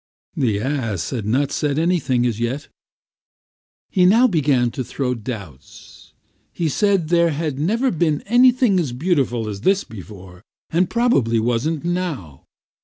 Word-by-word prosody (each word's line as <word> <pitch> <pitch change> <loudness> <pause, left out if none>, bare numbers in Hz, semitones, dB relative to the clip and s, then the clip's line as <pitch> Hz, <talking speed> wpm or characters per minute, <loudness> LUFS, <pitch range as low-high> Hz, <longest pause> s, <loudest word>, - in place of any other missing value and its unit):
The 110 -6 0
ass 115 - -2
had 115 -5 -4
not 135 +5 +1
said 145 -1 -1
anything 160 -7 +1
as 115 -3 -1
yet; 120 +5 -3 1.2
he 185 - +2
now 220 +8 +5
began 140 - +2
to 130 - -4
throw 125 +1 -2
doubts. 100 - -10 0.4
He 165 -2 -2
said 195 -2 +1
there 170 -1 +3
had 150 -2 -3
never 230 - +1
been 155 -3 0
anything 245 -3 +4
as 145 -8 -2
beautiful 130 -6 0
as 100 -2 -6
this 195 - +2
before, 95 -3 -12 0.3
and 175 +2 +1
probably 185 - +2
wasn't 125 +8 -1
now. 165 - -4
145 Hz, 140 wpm, -20 LUFS, 115-175 Hz, 1.2 s, now